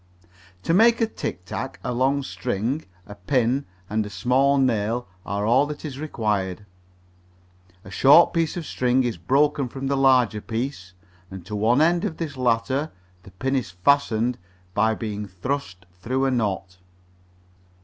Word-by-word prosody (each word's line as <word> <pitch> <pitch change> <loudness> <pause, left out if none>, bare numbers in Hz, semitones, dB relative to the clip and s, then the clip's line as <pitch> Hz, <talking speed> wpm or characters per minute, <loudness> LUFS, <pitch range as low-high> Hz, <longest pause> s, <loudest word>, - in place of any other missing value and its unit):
To 165 - +1
make 230 +5 +5
a 230 - +3
tic 90 - -6
tac 130 +8 -5
a 125 - -2
long 135 +3 +1
string, 125 +4 -3 0.2
a 105 - -10
pin 125 +6 0 0.2
and 110 +2 0
a 105 - -7
small 130 +8 +2
nail 120 -3 0 0.2
are 100 +2 -2
all 130 +6 +4
that 150 +1 -7
is 140 -3 -6
required. 105 - -2 1.2
A 95 - -12
short 145 +12 +6
piece 165 -1 0
of 170 - -4
string 125 -1 +1
is 120 -5 -2
broken 135 - +1
from 135 +2 -6
the 140 +1 0
larger 130 -5 +3
piece, 115 -6 -4 0.4
and 95 -3 -9
to 105 - -5
one 115 +6 +3
end 170 +2 +3
of 180 -7 -3
this 160 -4 -4
latter 130 +4 0 0.3
the 95 - -14
pin 130 +9 -2
is 125 -8 -1
fastened 115 +4 +1 0.3
by 110 +2 +2
being 105 -2 -5
thrust 95 -1 -5
through 130 +9 -2
a 135 - +1
knot. 95 -6 -2
125 Hz, 160 wpm, -24 LUFS, 105-140 Hz, 1.2 s, short